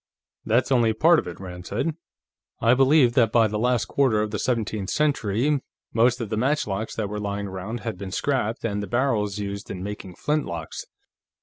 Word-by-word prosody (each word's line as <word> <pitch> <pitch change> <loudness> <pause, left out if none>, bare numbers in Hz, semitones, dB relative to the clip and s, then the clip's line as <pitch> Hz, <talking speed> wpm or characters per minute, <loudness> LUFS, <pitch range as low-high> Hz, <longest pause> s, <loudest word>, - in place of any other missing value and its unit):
"That's 120 +4 +1
only 120 -4 +4
part 160 +9 +5
of - - -6
it," 85 - -7
Rand 90 -1 -8
said. 150 +10 -1 0.6
"I 115 +2 +4
believe 135 -1 +5
that 115 -3 +3
by 115 -1 +5
the 105 0 -3
last 125 0 +2
quarter 130 -6 +2
of 105 0 -1
the 105 - -2
seventeenth 110 -5 -1
century, 140 -1 +1 0.3
most 120 +2 +3
of 115 -4 -4
the 110 - 0
matchlocks 110 -5 -1
that 110 -2 -2
were 105 +1 -4
lying 100 0 -3
around 95 +5 -5
had 110 -6 -5
been 100 -1 -5
scrapped, 115 +1 -1
and 105 -2 -1
the 100 - -5
barrels 115 -6 0
used 100 -1 -5
in 90 -1 -5
making 100 -3 -7
flintlocks. 85 - -3
110 Hz, 190 wpm, -24 LUFS, 100-125 Hz, 0.6 s, part